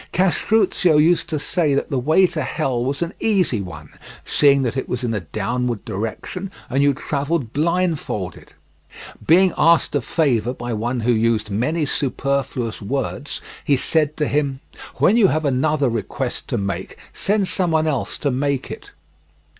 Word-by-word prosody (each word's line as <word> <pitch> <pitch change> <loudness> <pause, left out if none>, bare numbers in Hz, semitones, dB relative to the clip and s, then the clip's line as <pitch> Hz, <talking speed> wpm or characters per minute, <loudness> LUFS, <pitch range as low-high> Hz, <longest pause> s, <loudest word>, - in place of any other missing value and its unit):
Castruccio 185 -2 +3
used 165 +3 +3
to 155 - -1
say 150 -1 0
that 140 - -2
the 135 - +1
way 155 +9 +4
to 165 -3 -2
hell 130 -2 -1
was 140 +5 -1
an 170 +3 -5
easy 185 - +1
one, 80 -5 -9 0.4
seeing 140 -2 +4
that 125 0 -1
it 130 - -3
was 125 0 -2
in 115 -2 -1
a 105 - -1
downward 115 +6 -3
direction 115 - -5 0.2
and 135 +2 +2
you 140 0 +4
travelled 140 -3 -2
blindfolded. 160 - -2 0.7
Being 180 +2 +5
asked 170 0 +4
a - - +1
favour 125 -7 0
by 120 -1 -4
one 120 +3 -2
who 120 +2 +2
used 110 -2 +1
many 150 +10 0
superfluous 135 -4 -1
words, 135 +5 -3 0.2
he 140 - +2
said 150 +2 0
to 150 - 0
him: 140 -2 0 0.4
"When 215 - +3
you 215 -5 +6
have 155 -3 0
another 140 +1 +1
request 115 -2 -3
to - - -1
make, 100 -1 -4 0.2
send 200 -1 0
someone 165 -5 +1
else 140 -6 -1
to 140 - -1
make 140 +1 -1
it." - - -9
140 Hz, 160 wpm, -21 LUFS, 120-160 Hz, 0.7 s, you